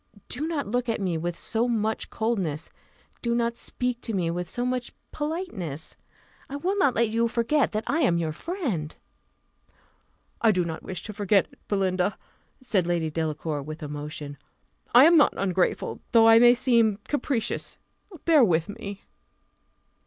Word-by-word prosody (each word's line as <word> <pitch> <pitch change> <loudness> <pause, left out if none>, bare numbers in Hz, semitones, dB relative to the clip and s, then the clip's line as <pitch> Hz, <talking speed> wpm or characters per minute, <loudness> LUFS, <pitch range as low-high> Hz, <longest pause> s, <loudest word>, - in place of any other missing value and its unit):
Do 295 +6 -2
not 315 -4 -2
look 245 +3 -1
at 230 - 0
me 185 -4 -1
with 170 +1 -3
so 230 +1 -1
much 220 -2 -1
coldness; 195 -10 -2 0.5
do 235 -1 0
not 235 0 0
speak 250 0 -3
to 225 - -3
me 170 -3 0
with 175 0 -4
so 245 0 -2
much 250 -1 -2 0.2
politeness. 295 - -4 0.5
I 275 - -5
will 360 +8 -1
not 280 -10 +3
let 230 -1 +2
you 230 +1 +1
forget 240 +5 +1
that 215 +1 -1
I 315 - 0
am 240 - +3
your 165 -2 -1
friend." 215 - -3 1.5
"I 230 - +5
do 180 -3 +1
not 160 -1 -5
wish 190 - -5
to 215 - -6
forget 200 -1 +2
it, - - -21
Belinda," 190 -1 0 0.5
said 195 -9 +1
Lady 170 -3 0
Delacour, 155 -1 -2
with 155 +3 -8
emotion; 145 -1 -6 0.6
"I 250 - +10
am 335 +1 +7
not 295 - +5
ungrateful, 185 -2 0
though 225 -1 +7
I 225 0 +8
may 240 +1 +7
seem 235 -5 +3
capricious 275 -6 -2 0.5
bear 315 -5 +6
with 170 -4 +2
me." 200 -1 -7
220 Hz, 160 wpm, -26 LUFS, 170-245 Hz, 1.5 s, I